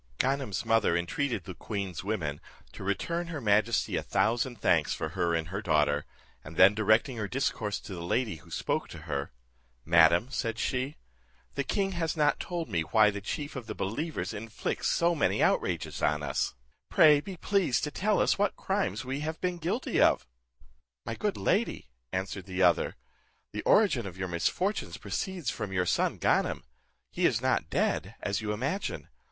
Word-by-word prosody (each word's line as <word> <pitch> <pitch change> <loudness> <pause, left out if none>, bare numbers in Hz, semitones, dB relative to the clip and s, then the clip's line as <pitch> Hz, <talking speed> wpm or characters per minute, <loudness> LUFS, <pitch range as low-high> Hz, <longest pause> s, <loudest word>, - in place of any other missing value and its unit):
Ganem's 135 -6 0
mother 110 -6 +3
entreated 105 +5 -1
the 95 - -7
queen's 95 -1 -4
women 80 -9 -2 0.3
to - - -9
return 170 - -1
her 165 -3 -4
majesty 110 0 +2
a - - 0
thousand 120 +2 0
thanks - - +2
from - - -4
her 85 -1 0
and 80 -1 -2
her 95 +3 -3
daughter, 75 -5 +2 0.4
and 80 +3 -10
then 95 +3 +8
directing 110 +4 +2
her 105 -2 -2
discourse 110 -5 -1
to 100 - -8
the 85 - -6
lady 105 +2 0
who 70 - -17
spoke - - -1
to 80 -2 -10
her, 70 -4 -3 0.5
"Madam," 85 +8 +5
said 115 -4 -2
she, 130 +5 -2 0.6
"the 140 - -1
king 195 +7 0
has 165 -3 -2
not 150 -1 +3
told 175 -2 -3
me 85 -7 0
why 105 +6 +4
the 100 0 -6
chief 145 +9 -4
of 125 -4 -6
the 110 - -5
believers 110 - -3
inflicts 110 +1 -3
so 170 +1 +3
many 155 - +1
outrages - - 0
on 75 0 +1
us: 70 - -1 0.3
pray 150 -2 +7
be 190 +2 -8
pleased 185 -10 +1
to 150 - -2
tell 205 +6 +1
us - - +2
what 205 0 +2
crimes 195 -8 -1
we 135 +2 -3
have 160 +2 -4
been 180 -1 -2
guilty 185 +10 0
of." - - +4 0.8
"My 115 - -3
good 205 - -2
lady," 190 - 0 0.2
answered 95 +1 -3
the 95 0 0
other, 85 -3 +3 0.6
"the - - -3
origin 140 - +4
of 95 -1 -9
your 95 0 -3
misfortunes 180 - -1
proceeds 185 - -3
from 100 - -5
your 90 -1 +1
son - - +1
Ganem. - - +1 0.5
He - - +3
is - - +1
not - - 0
dead, - - 0
as 100 0 -2
you 105 -1 -2
imagine. 140 - -2
110 Hz, 180 wpm, -29 LUFS, 95-150 Hz, 0.8 s, then